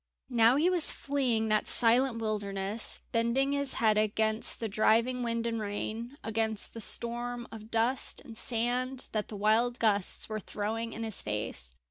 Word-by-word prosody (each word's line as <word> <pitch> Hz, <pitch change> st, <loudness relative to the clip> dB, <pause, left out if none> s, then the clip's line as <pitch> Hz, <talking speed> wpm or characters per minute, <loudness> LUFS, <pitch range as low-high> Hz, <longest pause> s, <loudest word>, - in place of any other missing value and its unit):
Now 235 Hz, 0 st, +5 dB
he 305 Hz, +5 st, +2 dB
was 360 Hz, -3 st, +5 dB
fleeing 250 Hz, -6 st, -1 dB
that 215 Hz, 0 st, +1 dB
silent 240 Hz, +1 st, +3 dB
wilderness, 205 Hz, -1 st, -2 dB
bending 235 Hz, +4 st, +1 dB
his 280 Hz, -1 st, 0 dB
head 215 Hz, -4 st, +2 dB
against 220 Hz, +1 st, +2 dB
the 225 Hz, -, -2 dB
driving 230 Hz, +4 st, +2 dB
wind 230 Hz, -1 st, -2 dB
and 230 Hz, -1 st, -2 dB
rain, 220 Hz, +5 st, -5 dB
against 220 Hz, -1 st, -1 dB
the 230 Hz, -, -5 dB
storm 240 Hz, +2 st, 0 dB
of 220 Hz, -1 st, -10 dB
dust 230 Hz, +3 st, 0 dB
and 225 Hz, -, -12 dB
sand 245 Hz, +3 st, 0 dB
that 215 Hz, -1 st, -2 dB
the 210 Hz, -, -8 dB
wild 225 Hz, +4 st, +2 dB
gusts 205 Hz, -5 st, +1 dB
were 215 Hz, -1 st, -4 dB
throwing 220 Hz, +3 st, -4 dB
in 230 Hz, -, -6 dB
his 220 Hz, -3 st, +1 dB
face. 105 Hz, -, -4 dB
225 Hz, 160 wpm, -30 LUFS, 215-245 Hz, -, Now